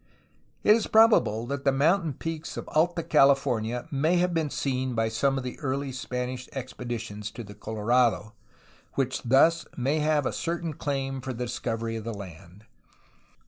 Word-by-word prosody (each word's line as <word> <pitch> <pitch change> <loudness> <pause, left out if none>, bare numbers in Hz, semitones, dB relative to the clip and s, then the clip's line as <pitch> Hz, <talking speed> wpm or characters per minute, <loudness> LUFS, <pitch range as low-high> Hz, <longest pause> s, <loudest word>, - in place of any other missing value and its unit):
It 210 - +7
is 225 - -1
probable 125 - +4
that 140 +1 -4
the 135 - +4
mountain 160 +4 +2
peaks 160 +3 -5
of - - -6
Alta 170 +2 +1
California 135 -5 +2
may 155 +5 +2
have 180 0 +1
been 160 -3 0
seen 130 -3 -2
by 115 0 +1
some 135 +5 +1
of 135 - -3
the 125 - -6
early 140 -1 -2
Spanish 125 -1 -4
expeditions 120 -5 -5
to 115 +3 -8
the 105 -1 -10
Colorado, 110 -1 +1 0.6
which 130 -1 -1
thus 140 +7 +4
may 135 +5 +1
have 150 -2 +2
a - - -1
certain 165 -1 -3
claim 135 -2 -3
for 130 +1 -4
the 125 +1 -3
discovery 115 -1 -3
of 110 - -6
the 115 0 -4
land. 95 +1 -11
130 Hz, 165 wpm, -27 LUFS, 115-150 Hz, 0.6 s, It